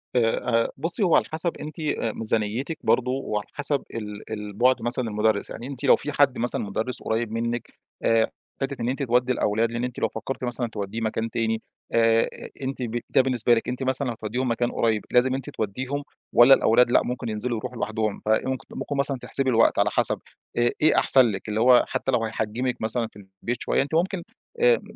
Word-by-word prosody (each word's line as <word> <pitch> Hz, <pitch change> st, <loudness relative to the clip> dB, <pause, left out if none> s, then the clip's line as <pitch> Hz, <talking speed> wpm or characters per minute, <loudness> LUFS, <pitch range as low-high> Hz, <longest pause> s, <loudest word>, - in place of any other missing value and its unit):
آآ، 125 Hz, -, +4 dB, 0.4 s
آآ، -, -, -4 dB
بُصّي، 165 Hz, -, 0 dB
هو 175 Hz, -4 st, +4 dB
على -, -, +4 dB
حسب 160 Hz, +2 st, -2 dB
أنتِ 150 Hz, +1 st, -7 dB, 0.4 s
ميزانيتِك 115 Hz, +7 st, 0 dB
برضه 125 Hz, 0 st, +2 dB
وعلى 105 Hz, -6 st, -3 dB
حسب 145 Hz, -1 st, +1 dB
ال 105 Hz, -1 st, -7 dB
ال 105 Hz, -1 st, -5 dB
بُعد 125 Hz, +4 st, +3 dB
مثلًا 120 Hz, +1 st, -1 dB
المدرّس، 105 Hz, 0 st, +1 dB
يعني 120 Hz, +3 st, -6 dB
أنتِ 135 Hz, -3 st, -8 dB
لو -, -, +7 dB
في 150 Hz, -, -5 dB
حد 140 Hz, -2 st, +3 dB
مثلًا 120 Hz, +1 st, 0 dB
مدرّس 110 Hz, +5 st, -3 dB
قريب 110 Hz, 0 st, -1 dB
منِّك 115 Hz, +1 st, -3 dB, 0.3 s
آآ، 115 Hz, -1 st, +3 dB, 0.3 s
حتة 135 Hz, 0 st, -3 dB
إن 115 Hz, -, 0 dB
أنتِ 135 Hz, +2 st, -2 dB
تودي 125 Hz, 0 st, +2 dB
الأولاد 115 Hz, 0 st, +1 dB
لإن 120 Hz, +1 st, -3 dB
أنتِ 125 Hz, -1 st, -4 dB
لو -, -, +2 dB
فكرتِ 135 Hz, -, -5 dB
مثلًا 120 Hz, 0 st, -1 dB
توديه 110 Hz, 0 st, -5 dB
مكان 115 Hz, +1 st, -1 dB
تاني، 110 Hz, 0 st, -1 dB, 0.3 s
آآ، 115 Hz, 0 st, +4 dB, 0.4 s
أنتِ 130 Hz, 0 st, -4 dB
ب 120 Hz, 0 st, -2 dB
ده 130 Hz, -, +5 dB
بالنسبة 125 Hz, -2 st, +3 dB
لِك 115 Hz, -, 0 dB
أنتِ 125 Hz, +2 st, -3 dB
مثلًا 130 Hz, +1 st, 0 dB
لو 120 Hz, -, -1 dB
هتوديهم 115 Hz, +3 st, -3 dB
مكان 120 Hz, +1 st, 0 dB
قريب، 110 Hz, -3 st, 0 dB
لازم 130 Hz, +1 st, +3 dB
أنتِ 135 Hz, -, -5 dB
توديهم 130 Hz, +7 st, -3 dB, 0.3 s
والَّا 120 Hz, +3 st, +8 dB
الأولاد 120 Hz, 0 st, +4 dB
لأ -, -, +5 dB
ممكن 125 Hz, -1 st, -4 dB
ينزلوا 110 Hz, +2 st, -2 dB
يروحوا 125 Hz, +2 st, -6 dB
لوحدهم؟ 110 Hz, -2 st, -2 dB
فممكن 130 Hz, +5 st, 0 dB
ممكن 145 Hz, -, -4 dB
مثلًا 140 Hz, -1 st, 0 dB
تحسبي 135 Hz, -1 st, 0 dB
الوقت 115 Hz, -2 st, +4 dB
على -, -, +3 dB
حسب -, -, 0 dB, 0.4 s
آآ، 120 Hz, 0 st, +4 dB
إيه 155 Hz, -, +5 dB
أحسن 130 Hz, -2 st, +5 dB
لِك 100 Hz, +2 st, -6 dB
اللي 105 Hz, +1 st, -1 dB
هو 125 Hz, +1 st, +6 dB
حتى 135 Hz, -, -1 dB
لو 120 Hz, -2 st, +1 dB
هيحجِّمك 110 Hz, +3 st, -2 dB
مثلًا 115 Hz, +1 st, -1 dB
في 105 Hz, -, -13 dB, 0.2 s
البيت 120 Hz, +1 st, -1 dB
شوية -, -, +1 dB
أنتِ 145 Hz, +3 st, -2 dB
ممكن 175 Hz, +1 st, 0 dB, 0.4 s
آآ، 485 Hz, 0 st, +4 dB
120 Hz, 200 wpm, -25 LUFS, 110-130 Hz, 0.4 s, والَّا